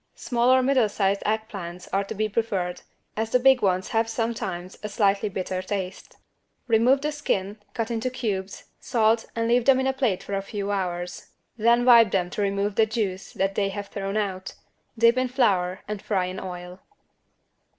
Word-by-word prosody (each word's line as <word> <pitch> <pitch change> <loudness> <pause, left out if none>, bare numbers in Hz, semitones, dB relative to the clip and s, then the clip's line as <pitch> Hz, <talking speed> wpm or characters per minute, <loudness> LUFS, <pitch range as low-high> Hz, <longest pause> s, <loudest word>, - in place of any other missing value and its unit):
Small 240 0 0
or 260 0 +5
middle 255 -5 +3
sized 200 -1 0
egg 220 +1 0
plants 180 -4 -8
are 195 +1 0
to 200 - -6
be 215 +1 0
preferred, 200 -5 -2 0.3
as 220 +1 -2
the 250 - +3
big 265 0 +5
ones 185 -2 +1
have 225 0 +1
sometimes 205 -6 -3
a 210 - -5
slightly 205 0 +1
bitter 185 -1 -3
taste. 185 -1 -5 0.5
Remove 245 +4 +4
the 300 +1 -1
skin, 210 -8 -2 0.2
cut 230 0 -2
into 235 +2 -1
cubes, 205 -6 -4 0.2
salt 225 -2 +2
and 230 0 0
leave 240 0 +3
them 270 -1 +5
in 265 - 0
a 265 - +1
plate 250 -9 0
for 200 - -6
a 195 - 0
few 200 0 -4
hours. 180 -2 -3 0.3
Then 235 +1 +3
wipe 235 -4 +7
them 180 -2 0
to 210 - -3
remove 200 +1 0
the 220 -1 +4
juice 205 -4 -3
that 195 0 0
they 200 0 0
have 200 0 -6
thrown 195 +1 -3
out, 190 -3 -3 0.4
dip 230 +2 +5
in 255 0 +2
flour 195 -8 +1
and 210 -1 -4
fry 190 -4 0
in 185 +1 -5
oil. 180 0 -8
210 Hz, 190 wpm, -25 LUFS, 190-235 Hz, 0.5 s, wipe